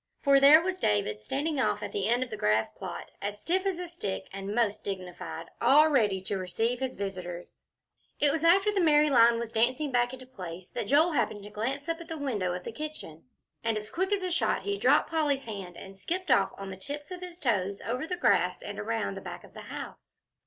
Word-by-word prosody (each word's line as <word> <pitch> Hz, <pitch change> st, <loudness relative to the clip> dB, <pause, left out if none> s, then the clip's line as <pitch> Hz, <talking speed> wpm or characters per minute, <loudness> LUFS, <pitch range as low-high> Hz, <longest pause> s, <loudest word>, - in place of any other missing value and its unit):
for 275 Hz, -1 st, +6 dB
there 295 Hz, +4 st, +8 dB
was 370 Hz, 0 st, -2 dB
David 105 Hz, 0 st, 0 dB
standing 290 Hz, -, -2 dB
off -, -, +1 dB
at -, -, -4 dB
the 415 Hz, -, -1 dB
end 240 Hz, +2 st, +3 dB
of 250 Hz, -, -10 dB
the -, -, -3 dB
grass 110 Hz, -, +1 dB
plot, 180 Hz, +5 st, -7 dB
as 205 Hz, +1 st, -4 dB
stiff 370 Hz, -, 0 dB
as 380 Hz, -3 st, -1 dB
a 360 Hz, 0 st, -5 dB
stick, 205 Hz, -, -5 dB
and 195 Hz, +1 st, -4 dB
most 225 Hz, -4 st, +1 dB
dignified, 185 Hz, -3 st, -6 dB, 0.2 s
all 305 Hz, +3 st, +6 dB
ready 210 Hz, -9 st, +2 dB
to 190 Hz, +1 st, -3 dB
receive 225 Hz, +7 st, -1 dB
his 260 Hz, -1 st, -3 dB
visitors. 180 Hz, -3 st, -6 dB, 0.6 s
It 290 Hz, -1 st, +4 dB
was 315 Hz, +1 st, -2 dB
after 390 Hz, +5 st, +5 dB
the 400 Hz, -2 st, +1 dB
merry 300 Hz, -2 st, +5 dB
line 235 Hz, -2 st, +6 dB
was 230 Hz, -1 st, -4 dB
dancing 255 Hz, +6 st, +1 dB
back 245 Hz, -1 st, +2 dB
into 260 Hz, 0 st, -9 dB
place 185 Hz, -8 st, -9 dB
that -, -, -4 dB
Joel 310 Hz, +7 st, +4 dB
happened 215 Hz, -7 st, -1 dB
to 205 Hz, -, -10 dB
glance 265 Hz, +8 st, -3 dB
up 330 Hz, 0 st, -2 dB
at 335 Hz, -, -10 dB
the 325 Hz, -1 st, -5 dB
window 220 Hz, -11 st, -1 dB
of 180 Hz, 0 st, -4 dB
the -, -, -5 dB
kitchen. 230 Hz, -, -7 dB, 0.4 s
And 225 Hz, -1 st, 0 dB
as 210 Hz, 0 st, -7 dB
quick 380 Hz, +3 st, -1 dB
as 400 Hz, -2 st, +1 dB
a 365 Hz, -, -1 dB
shot 345 Hz, -, +1 dB
he 405 Hz, 0 st, -1 dB
dropped 445 Hz, -, +3 dB
Polly's 295 Hz, -4 st, +1 dB
hand 195 Hz, -6 st, -7 dB
and 195 Hz, 0 st, -10 dB
skipped 355 Hz, -, -2 dB
off 200 Hz, -6 st, +4 dB
on 195 Hz, -1 st, -6 dB
the 190 Hz, -, -7 dB
tips 290 Hz, -, -7 dB
of 365 Hz, 0 st, -6 dB
his 355 Hz, -1 st, -9 dB
toes 200 Hz, -, 0 dB
over 250 Hz, +8 st, -2 dB
the 360 Hz, -, -3 dB
grass -, -, +2 dB
and -, -, -6 dB
around -, -, -2 dB
the -, -, -7 dB
back -, -, -8 dB
of -, -, -16 dB
the -, -, -9 dB
house. -, -, -8 dB
245 Hz, 230 wpm, -29 LUFS, 195-315 Hz, 0.6 s, there